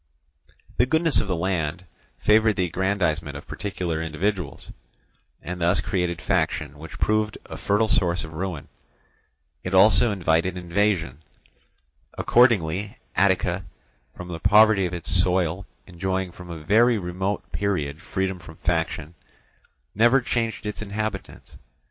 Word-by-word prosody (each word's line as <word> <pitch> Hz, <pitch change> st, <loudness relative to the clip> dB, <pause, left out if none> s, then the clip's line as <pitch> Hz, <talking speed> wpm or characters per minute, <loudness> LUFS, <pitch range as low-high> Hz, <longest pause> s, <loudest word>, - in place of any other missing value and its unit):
The 120 Hz, -, +3 dB
goodness 160 Hz, +1 st, +2 dB
of -, -, -5 dB
the 95 Hz, -, 0 dB
land 90 Hz, -1 st, -2 dB, 0.3 s
favoured 110 Hz, 0 st, +3 dB
the 90 Hz, -, +1 dB
aggrandizement 85 Hz, -5 st, -1 dB
of 70 Hz, -, -11 dB
particular 90 Hz, -5 st, -3 dB
individuals, 85 Hz, +1 st, -3 dB, 0.7 s
and 90 Hz, 0 st, -6 dB
thus 85 Hz, +2 st, +3 dB
created 90 Hz, 0 st, -1 dB
faction 75 Hz, -1 st, -1 dB
which 80 Hz, +1 st, -9 dB
proved 110 Hz, 0 st, 0 dB
a -, -, -8 dB
fertile 105 Hz, +2 st, +1 dB
source 90 Hz, -6 st, +1 dB
of 80 Hz, 0 st, -9 dB
ruin. 85 Hz, -2 st, -4 dB, 1.0 s
It 90 Hz, +1 st, -2 dB
also 110 Hz, +4 st, +5 dB
invited 90 Hz, -1 st, +1 dB
invasion. 90 Hz, -5 st, 0 dB, 1.0 s
Accordingly 105 Hz, -5 st, +2 dB, 0.2 s
Attica, 95 Hz, 0 st, +2 dB, 0.5 s
from 90 Hz, 0 st, -8 dB
the 85 Hz, -2 st, -5 dB
poverty 105 Hz, -1 st, +5 dB
of 90 Hz, -, -8 dB
its 85 Hz, -, -2 dB
soil 90 Hz, 0 st, +2 dB, 0.2 s
enjoying 95 Hz, +1 st, -3 dB
from 90 Hz, +1 st, -12 dB
a 80 Hz, -2 st, -7 dB
very 115 Hz, +7 st, +4 dB
remote 95 Hz, +1 st, -3 dB
period 80 Hz, -7 st, -2 dB
freedom 95 Hz, -2 st, -2 dB
from 80 Hz, -2 st, -12 dB
faction, 80 Hz, -1 st, -2 dB, 0.8 s
never 120 Hz, +5 st, +5 dB
changed 115 Hz, -3 st, -2 dB
its 105 Hz, 0 st, -4 dB
inhabitants. 105 Hz, -1 st, -5 dB
95 Hz, 130 wpm, -24 LUFS, 85-105 Hz, 1.0 s, also